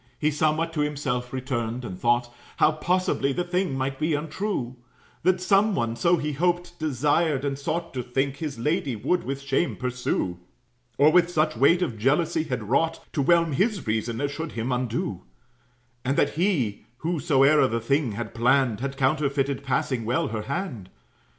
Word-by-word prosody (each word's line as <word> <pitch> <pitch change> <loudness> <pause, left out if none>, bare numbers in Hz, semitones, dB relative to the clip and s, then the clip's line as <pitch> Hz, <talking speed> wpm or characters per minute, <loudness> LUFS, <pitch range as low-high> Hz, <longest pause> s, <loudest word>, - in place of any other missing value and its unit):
He 150 0 +1
somewhat 155 +2 0
to 150 - 0
himself 135 -4 -2
returned, 125 -2 -3
and 90 -5 -7
thought 120 +1 +1 0.2
How 155 - +5
possibly 155 -4 0
the 175 - -1
thing 180 -5 -1
might 135 0 -2
be 155 0 +1
untrue: 150 - -3 0.5
That 185 +1 +2
some 195 +2 +3
one 115 -1 -1
(so 170 +9 +3
he 150 -1 -2
hoped, 175 +3 -1
desired, 150 0 +1
and 140 -1 -1
sought 165 +5 -3
To 130 - -2
think) 135 +3 -1
his 150 -6 -4
lady 140 +1 0
would 175 +12 0
with 135 +1 -4
shame 140 +5 0
pursue; 125 -8 -2 0.6
Or 150 +2 +6
with 175 0 +4
such 155 -4 +1
weight 170 +9 +4
of 120 -11 -4
jealousy 155 +6 +1
had 125 -5 -3
wrought 160 +7 +1
To 145 - +1
whelm 170 +2 +3
his 200 - 0
reason, 110 +1 -1
as 145 0 -1
should 160 +2 -5
him 115 +2 -2
undo; 120 -7 -2 0.8
And 135 +2 0
that 145 - +3
he, 155 - 0 0.2
whosoe'er 150 -3 +3
the 115 -1 -1
thing 130 +1 0
had 115 +1 -5
planned, 120 -1 +2
Had 135 +1 -4
counterfeited 140 0 0
passing 130 -2 -1
well 120 +3 0
her 110 -1 -3
hand. 130 - -4
140 Hz, 170 wpm, -25 LUFS, 125-160 Hz, 0.8 s, Or